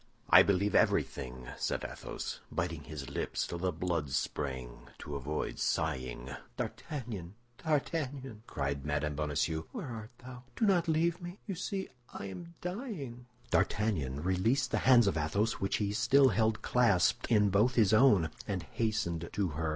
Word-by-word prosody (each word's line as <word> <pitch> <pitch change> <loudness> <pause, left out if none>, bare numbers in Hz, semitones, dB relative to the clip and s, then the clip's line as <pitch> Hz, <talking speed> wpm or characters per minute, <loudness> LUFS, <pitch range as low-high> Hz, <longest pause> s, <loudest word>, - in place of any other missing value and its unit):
"I - - +11
believe 100 +1 +2
everything," 65 -1 +1
said - - -1
Athos, - - -5
biting 85 -3 -2
his 75 -3 -7
lips - - -2
till 85 - -5
the 90 +1 0
blood 85 -6 -2
sprang 65 -3 -3
to 75 - -7
avoid 70 +3 -3
sighing. 65 0 -1 0.3
"D'Artagnan, 110 - -5 0.3
D'Artagnan!" 140 -6 -1
cried 70 0 -2
Mme. 75 +1 -1
Bonacieux, 75 +2 -1
"where - - -5
art 110 -2 -6
thou? 125 0 -10
Do 225 - +2
not 180 -4 +3
leave 165 +2 +1
me! 175 +2 -7
You 200 - -3
see 190 +2 -3 0.2
I - - -6
am 170 - -8
dying!" 175 - -5 0.2
D'Artagnan 75 -11 +1
released 95 +9 +1
the - - +2
hands 120 -3 +8
of 100 -4 +1
Athos 100 +9 0
which 95 - 0
he 100 -1 -1
still 135 +5 +5
held 110 +1 +1
clasped 105 -8 +3
in 105 -3 +5
both 110 +6 +3
his 110 -4 +4
own, 105 - +5 0.2
and 95 -5 -2
hastened 105 -7 -2
to 100 -3 0
her. 80 +1 -2
100 Hz, 155 wpm, -32 LUFS, 75-125 Hz, 0.3 s, I